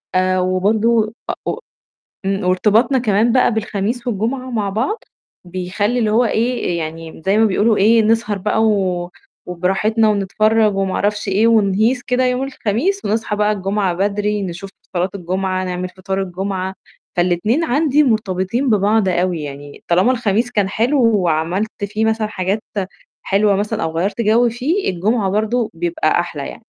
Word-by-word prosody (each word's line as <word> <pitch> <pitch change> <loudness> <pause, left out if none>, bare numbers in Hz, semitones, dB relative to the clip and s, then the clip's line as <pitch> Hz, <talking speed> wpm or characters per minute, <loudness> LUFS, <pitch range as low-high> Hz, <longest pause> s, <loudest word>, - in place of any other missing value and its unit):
آآ، 185 0 +2
وبرضه 215 +4 +1 0.3
أو - - -2 0.7
إمم، 195 0 -1
وارتباطنا 210 +8 +3
كمان 225 -1 +2
بقى 250 -2 +3
بالخميس 220 +2 -2
والجمعة 245 +4 -2
مع 215 -4 -1
بعض 250 - -2 0.4
بيخلّي 185 +6 -2
اللي 220 -3 +1
هو 230 +3 +3
إيه، 230 -6 0
يعني 160 0 -6
م - - -14
زي 200 +2 +3
ما 225 - +5
بيقولوا 215 +2 +2
إيه، 225 +3 +4
نسهر 220 -1 +1
بقى 210 +3 0
و 185 -5 0 0.4
وبراحتنا 195 +5 +1
ونتفرّج 215 +1 +2
وما 195 -1 -1
أعرفش 205 0 -1
إيه 205 +4 +3
ونهيص 220 +3 +2
كده 250 +1 0
يوم 250 +1 0
الخميس 270 - -1
ونصحى 215 0 -1
بقى 210 0 +2
الجمعة 195 -2 -1
بدري 205 +2 -1
نشوف 190 +1 -6 0.3
صلاة 180 +2 0
الجمعة، 185 0 -2
نعمل 180 0 -3
فطار 190 +1 -4
الجمعة، 190 0 -4 0.4
فالاتنين 180 - +1
عندي 300 +1 +2
مرتبطين 220 0 0
ببعض 210 0 +2
أوي، 175 -2 0
يعني 145 0 -9
طالما 185 +8 +3
الخميس 230 -1 0
كان 205 -5 +1
حلو 245 +8 +1 0.2
وعملت 180 +4 -1
في 210 +2 -2
مثلًا 220 -1 +1
حاجات 200 0 -2 0.6
حلوة 200 0 +2
مثلًا 210 +2 -2
أو 160 0 -2
غيّرت 195 +6 -1
جَو 230 +2 +3
فيه 275 - -1
الجمعة 195 +3 0
برضه 220 +3 0
بيبقى 170 -1 0
أحلى 150 -5 -5
يعني. - - -9
205 Hz, 155 wpm, -18 LUFS, 185-225 Hz, 0.7 s, ما